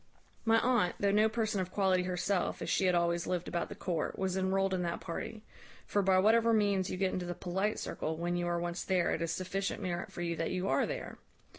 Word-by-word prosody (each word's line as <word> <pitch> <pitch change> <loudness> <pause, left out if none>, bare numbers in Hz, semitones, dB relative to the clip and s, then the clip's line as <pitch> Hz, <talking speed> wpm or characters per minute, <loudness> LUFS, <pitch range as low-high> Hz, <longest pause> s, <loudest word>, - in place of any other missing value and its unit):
"My 225 0 +5
aunt, 240 -8 +2
though 200 -1 +2
no 215 +2 +4
person 220 -3 0
of 185 - -4
quality 190 -1 +2
herself, 180 +1 -1
as - - -2
she 190 - +2
had 180 - +3
always 170 0 +1
lived 180 -1 -1
about 170 - -2
the - - -7
court, 175 -3 -2
was 190 -1 -1
enrolled 190 0 +1
in 185 - 0
that 170 -1 -2
party; 210 +6 -6 0.4
for, 205 - +1
by 190 -1 +4
whatever 225 +4 +4
means 200 -3 +2
you - - -3
get 190 0 0
into 180 -1 -3
the 175 - -3
polite 190 +5 -1
circle, 160 0 -3
when 175 +1 -1
you 175 0 -1
are 175 0 0
once 175 0 -3
there, 185 -2 +1
it - - -1
is 165 -1 -1
sufficient 185 +2 -2
merit 175 -3 -3
for - - -6
you 170 -1 -1
that 165 +1 -1
you 185 +1 -2
are - - +2
there. - - -5
185 Hz, 240 wpm, -32 LUFS, 175-200 Hz, 0.4 s, My